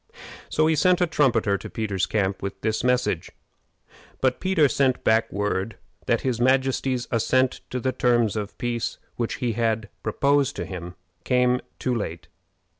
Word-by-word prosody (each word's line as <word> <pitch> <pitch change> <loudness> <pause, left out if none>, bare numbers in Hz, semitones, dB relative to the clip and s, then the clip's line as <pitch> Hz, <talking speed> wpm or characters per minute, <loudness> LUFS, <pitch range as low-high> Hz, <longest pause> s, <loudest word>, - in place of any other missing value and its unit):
So 155 - +2
he 160 0 +3
sent 180 +4 +3
a 180 - +4
trumpeter 120 - +2
to - - -8
Peter's 100 -4 -1
camp 100 -3 -1
with 100 0 -5
the 110 0 0
message; 125 -9 0 0.9
but 130 -1 +1
Peter 185 -6 +3
sent 135 -1 +2 0.3
word 100 0 -1
back 110 - -17 0.3
that 115 - +2
his 125 -3 -1
majesty's 130 -1 +1
assent 130 +3 +1
to 125 - -3
the 130 +1 0
terms 120 -4 +2
of 105 -1 -4
peace 120 -2 -2 0.2
which 115 -1 -1
he 125 -3 -1
had 110 -1 -1
proposed 140 +5 +1
to - - -4
him 90 -1 -7 0.3
came 125 +2 +2 0.2
too 130 - -1
late. 85 -7 -4
120 Hz, 160 wpm, -24 LUFS, 110-130 Hz, 0.9 s, a